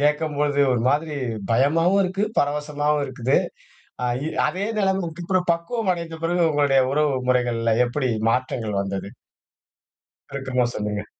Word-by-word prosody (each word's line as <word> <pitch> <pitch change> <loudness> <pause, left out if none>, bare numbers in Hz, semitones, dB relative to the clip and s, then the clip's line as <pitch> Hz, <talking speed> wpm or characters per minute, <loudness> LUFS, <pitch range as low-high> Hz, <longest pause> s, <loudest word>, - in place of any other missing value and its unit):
கேட்கும்போது, 150 -1 +1
ஒரு 120 - +1
மாதிரி 150 0 -1 0.4
பயமாவும் 165 +10 +3
இருக்கு. 190 +3 -2 0.2
பரவசமாவும் 145 0 0
இருக்குது. 130 0 0 0.7
அ, - - +1 0.2
இ - - -1 0.2
அதே 190 +3 -2
நிலைமைக்கு 180 -4 -1
அப்றம் 185 -2 +1
பக்குவம் 185 +4 -2
அடைந்த 170 -1 -6
பிறகு 175 +1 +1
உங்களுடைய 140 -2 +3
உறவு 150 -1 +2 0.2
முறைகள்ல 120 -3 +1
எப்டி 130 0 -1 0.2
மாற்றங்கள் 115 -4 -1
வந்தது? 100 0 -4 1.2
சுருக்கமா 130 -2 -1
சொல்லுங்க. 105 0 -3
145 Hz, 125 wpm, -23 LUFS, 125-170 Hz, 1.2 s, பயமாவும்